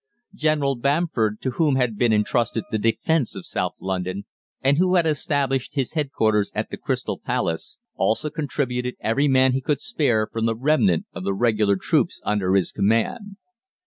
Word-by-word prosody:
"General 155 Hz, -5 st, +1 dB
Bamford, 130 Hz, -5 st, 0 dB
to 130 Hz, -, -1 dB
whom 150 Hz, +1 st, +2 dB
had 125 Hz, -4 st, +1 dB
been 120 Hz, +2 st, +2 dB
entrusted 115 Hz, +1 st, +1 dB
the 110 Hz, -, 0 dB
defence 120 Hz, +6 st, 0 dB
of 95 Hz, -, -7 dB
South -, -, -2 dB
London, 95 Hz, +1 st, -3 dB, 0.3 s
and 140 Hz, +3 st, +2 dB
who 185 Hz, 0 st, +3 dB
had 175 Hz, -2 st, +4 dB
established 140 Hz, -3 st, 0 dB
his 135 Hz, -4 st, -1 dB
headquarters 110 Hz, -9 st, +1 dB
at -, -, -3 dB
the -, -, -5 dB
Crystal -, -, -3 dB
Palace, 80 Hz, -1 st, -2 dB, 0.2 s
also 150 Hz, +7 st, 0 dB
contributed 125 Hz, -5 st, -2 dB
every 130 Hz, +6 st, +1 dB
man 130 Hz, -1 st, +4 dB
he 135 Hz, -, 0 dB
could 145 Hz, +2 st, 0 dB
spare 140 Hz, -, +1 dB
from 115 Hz, +1 st, -2 dB
the 115 Hz, -, 0 dB
remnant 115 Hz, -, +2 dB
of -, -, -6 dB
the 100 Hz, 0 st, -1 dB
Regular 105 Hz, -2 st, +2 dB
troops 95 Hz, -, 0 dB
under 100 Hz, -3 st, +1 dB
his 95 Hz, -3 st, +1 dB
command. 115 Hz, -, 0 dB
125 Hz, 170 wpm, -23 LUFS, 105-145 Hz, 0.3 s, had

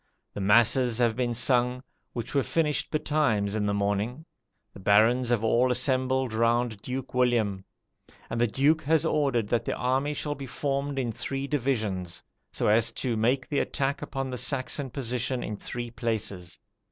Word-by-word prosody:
The 100 Hz, -, -5 dB
masses 115 Hz, +4 st, +4 dB
have 120 Hz, -2 st, +2 dB
been 120 Hz, -1 st, -1 dB
sung, 125 Hz, +1 st, +1 dB, 0.3 s
which 120 Hz, -2 st, -5 dB
were 140 Hz, -, +3 dB
finished 150 Hz, 0 st, 0 dB
betimes 145 Hz, -10 st, +1 dB
in 105 Hz, -1 st, 0 dB
the 100 Hz, -, +1 dB
morning; 105 Hz, +8 st, -1 dB, 0.5 s
the -, -, -12 dB
barons 115 Hz, +6 st, +4 dB
have 120 Hz, -3 st, +1 dB
all 120 Hz, +3 st, +3 dB
assembled 130 Hz, -1 st, +1 dB
round 115 Hz, -1 st, +1 dB
Duke 130 Hz, +3 st, -5 dB
William; 115 Hz, -6 st, +1 dB, 0.6 s
and 115 Hz, -, -2 dB
the 120 Hz, -, +4 dB
Duke 145 Hz, +8 st, +2 dB
has 160 Hz, +1 st, +2 dB
ordered 135 Hz, -9 st, +1 dB
that 120 Hz, -, +1 dB
the -, -, -2 dB
army 135 Hz, +4 st, 0 dB
shall 145 Hz, 0 st, -2 dB
be 140 Hz, -2 st, -8 dB
formed 140 Hz, +1 st, -2 dB
in 125 Hz, -3 st, -1 dB
three 135 Hz, +5 st, -3 dB
divisions, 110 Hz, -, -2 dB, 0.3 s
so -, -, -1 dB
as 110 Hz, +2 st, +4 dB
to 120 Hz, -1 st, -2 dB
make 125 Hz, +4 st, +1 dB
the 145 Hz, -, 0 dB
attack 140 Hz, 0 st, -1 dB
upon 135 Hz, -1 st, -4 dB
the 125 Hz, -, -4 dB
Saxon 135 Hz, 0 st, -1 dB
position 125 Hz, 0 st, -2 dB
in 105 Hz, -, -4 dB
three 120 Hz, +3 st, -5 dB
places. 110 Hz, -6 st, -3 dB
125 Hz, 165 wpm, -27 LUFS, 110-135 Hz, 0.6 s, masses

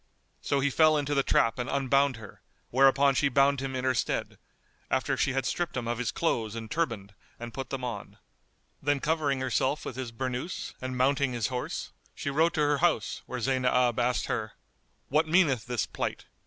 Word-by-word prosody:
So 140 Hz, -1 st, 0 dB
he 140 Hz, +1 st, +1 dB
fell 155 Hz, +2 st, +5 dB
into 145 Hz, 0 st, -1 dB
the 140 Hz, -, +3 dB
trap 115 Hz, -2 st, +2 dB
and 125 Hz, -, -2 dB
unbound 140 Hz, 0 st, +2 dB
her; 110 Hz, -3 st, -12 dB, 0.3 s
whereupon 135 Hz, +2 st, +5 dB
she 140 Hz, +1 st, +2 dB
bound 140 Hz, +1 st, +3 dB
him 135 Hz, 0 st, -4 dB
in 130 Hz, -, -2 dB
her 130 Hz, 0 st, +2 dB
stead, 120 Hz, -, -2 dB, 0.5 s
after -, -, +1 dB
she 135 Hz, -, +1 dB
had 135 Hz, 0 st, -1 dB
stripped 175 Hz, -6 st, -2 dB
him 120 Hz, -2 st, -3 dB
of 120 Hz, 0 st, -2 dB
his 120 Hz, -5 st, -1 dB
clothes 115 Hz, -6 st, -1 dB
and 110 Hz, -1 st, -7 dB
turband 115 Hz, -12 st, -2 dB, 0.3 s
and 120 Hz, 0 st, -7 dB
put 135 Hz, -, -5 dB
them 135 Hz, -2 st, -4 dB
on; 115 Hz, -6 st, -5 dB, 0.6 s
then 145 Hz, 0 st, +1 dB
covering 145 Hz, -3 st, 0 dB
herself 130 Hz, +3 st, 0 dB
with 125 Hz, -, -6 dB
his 130 Hz, -3 st, -4 dB
burnouse 130 Hz, +7 st, -4 dB
and 130 Hz, 0 st, -4 dB
mounting 135 Hz, 0 st, +2 dB
his 115 Hz, -3 st, -1 dB
horse, 125 Hz, -, -4 dB, 0.2 s
she 140 Hz, -, -3 dB
rode 160 Hz, +4 st, +2 dB
to 155 Hz, -, +1 dB
her 145 Hz, -1 st, +2 dB
house, 175 Hz, -1 st, +1 dB
where 125 Hz, -, -4 dB
Zaynab 125 Hz, -1 st, +2 dB
asked 125 Hz, +1 st, +1 dB
her, 110 Hz, -1 st, -3 dB, 0.6 s
"What 155 Hz, +3 st, +2 dB
meaneth 155 Hz, -, +3 dB
this 120 Hz, -2 st, -1 dB
plight?" -, -, -4 dB
130 Hz, 195 wpm, -28 LUFS, 125-140 Hz, 0.6 s, fell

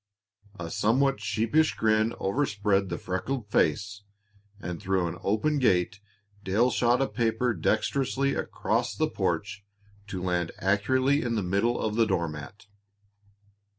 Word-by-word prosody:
A 85 Hz, -1 st, -6 dB
somewhat 130 Hz, +8 st, +2 dB
sheepish 115 Hz, +9 st, +1 dB
grin 110 Hz, +1 st, +2 dB
overspread 100 Hz, -4 st, 0 dB
the 85 Hz, -, -3 dB
freckled 105 Hz, +4 st, -4 dB
face, 100 Hz, +6 st, +1 dB, 0.6 s
and 90 Hz, -4 st, -6 dB
through 95 Hz, -2 st, 0 dB
an 85 Hz, +2 st, -6 dB
open 125 Hz, +9 st, +1 dB
gate 100 Hz, -4 st, +2 dB, 0.4 s
Dale 110 Hz, +7 st, +2 dB
shot 120 Hz, +3 st, +2 dB
a -, -, 0 dB
paper 120 Hz, +1 st, 0 dB
dexterously 135 Hz, -, 0 dB
across -, -, -1 dB
the -, -, +1 dB
porch 105 Hz, 0 st, -2 dB, 0.4 s
to 95 Hz, -3 st, -5 dB
land 90 Hz, -2 st, -1 dB
accurately 130 Hz, +9 st, +2 dB
in 120 Hz, -1 st, -1 dB
the 105 Hz, -, 0 dB
middle 100 Hz, +7 st, +1 dB
of 110 Hz, -, -1 dB
the 115 Hz, -1 st, +4 dB
door 85 Hz, -4 st, 0 dB
mat. 75 Hz, +8 st, -9 dB
105 Hz, 135 wpm, -27 LUFS, 95-120 Hz, 0.6 s, the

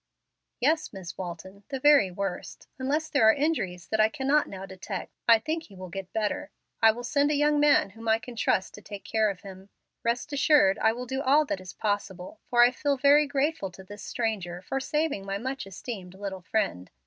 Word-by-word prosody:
"Yes, 310 Hz, +5 st, +1 dB
Miss 190 Hz, -4 st, -8 dB
Walton, 185 Hz, +2 st, -8 dB
the 270 Hz, -2 st, -3 dB
very 285 Hz, -8 st, +6 dB
worst. 185 Hz, 0 st, -5 dB
Unless 295 Hz, +5 st, -1 dB
there 225 Hz, -7 st, +5 dB
are -, -, +7 dB
injuries 225 Hz, -, -1 dB
that 220 Hz, -, 0 dB
I 215 Hz, 0 st, +5 dB
cannot 285 Hz, +3 st, +1 dB
now 190 Hz, 0 st, -7 dB
detect 190 Hz, 0 st, -6 dB, 0.2 s
I 230 Hz, -1 st, +8 dB
think 315 Hz, +8 st, -3 dB
he 200 Hz, -, -16 dB
will 185 Hz, -1 st, -8 dB
get 190 Hz, +1 st, -7 dB
better. 215 Hz, -2 st, -2 dB, 0.3 s
I 225 Hz, -, +8 dB
will 235 Hz, +2 st, -1 dB
send 285 Hz, +4 st, +2 dB
a 300 Hz, -, +1 dB
young 295 Hz, +1 st, +3 dB
man 290 Hz, -9 st, +4 dB
whom 225 Hz, +3 st, -10 dB
I 220 Hz, 0 st, +4 dB
can 240 Hz, +2 st, -10 dB
trust 190 Hz, -4 st, 0 dB
to 210 Hz, -, -11 dB
take 205 Hz, -1 st, -9 dB
care 220 Hz, -1 st, +1 dB
of 195 Hz, -2 st, -6 dB
him. 190 Hz, 0 st, -11 dB, 0.3 s
Best 235 Hz, +4 st, -1 dB
assured 285 Hz, -, +4 dB
I 220 Hz, -, +4 dB
will 245 Hz, +2 st, -5 dB
do 265 Hz, +2 st, -3 dB
all 290 Hz, +3 st, +4 dB
that 195 Hz, -9 st, -3 dB
is 185 Hz, -, -9 dB
possible, 205 Hz, -, -3 dB
for 240 Hz, -3 st, +6 dB
I 245 Hz, -, +6 dB
feel 280 Hz, +2 st, -1 dB
very 285 Hz, +2 st, +5 dB
grateful 280 Hz, -6 st, -1 dB
to 190 Hz, +1 st, -13 dB
this 205 Hz, +2 st, -11 dB
stranger 190 Hz, -6 st, -3 dB
for 270 Hz, +8 st, -2 dB
saving 300 Hz, -5 st, -1 dB
my 195 Hz, 0 st, -3 dB
much 260 Hz, 0 st, -4 dB
esteemed 190 Hz, -2 st, -7 dB
little 190 Hz, -1 st, -6 dB
friend. 175 Hz, -, -2 dB
220 Hz, 210 wpm, -27 LUFS, 195-280 Hz, 0.3 s, I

